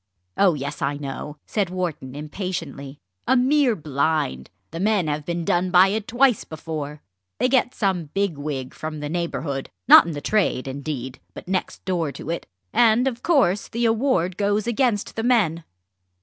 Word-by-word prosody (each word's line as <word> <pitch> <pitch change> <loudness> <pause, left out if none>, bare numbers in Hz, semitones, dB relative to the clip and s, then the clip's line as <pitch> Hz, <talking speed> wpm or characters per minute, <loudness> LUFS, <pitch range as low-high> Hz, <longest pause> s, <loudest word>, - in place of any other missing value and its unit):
"Oh 185 -5 +4
yes, 145 +1 -5
I 140 +1 0
know!" 145 +1 -6
said 200 -4 -1
Wharton 170 -8 -4
impatiently; 150 -3 -5 0.3
"a 260 - +4
mere 260 -1 +3
blind. 145 - -1 0.2
The 165 - -6
men 205 -2 +2
have 150 0 -3
been 170 -1 -2
done 180 +2 +1
by 185 +1 +6
it 215 +1 -2
twice 250 -1 +3
before. 155 -2 -6 0.3
They 250 - +2
get 255 -1 +2
some 190 -5 0
big 195 +3 -1
wig 140 -3 -5
from 155 -1 -6
the 145 0 -4
neighbourhood 160 -5 -3 0.2
not - - +9
in 170 - -3
the 145 - -4
trade, 185 -7 0
indeed, 135 -2 -5 0.2
but - - -10
next 185 0 -3
door 170 -5 0
to 165 - -6
it 170 - -4 0.3
and, 235 +2 +4
of 245 -2 -3
course, 255 - +2
the 235 +1 -1
award 225 -7 +1
goes 205 0 +1
against 235 -3 0
the 225 - -1
men." 210 -10 +2
175 Hz, 170 wpm, -23 LUFS, 150-215 Hz, 0.3 s, not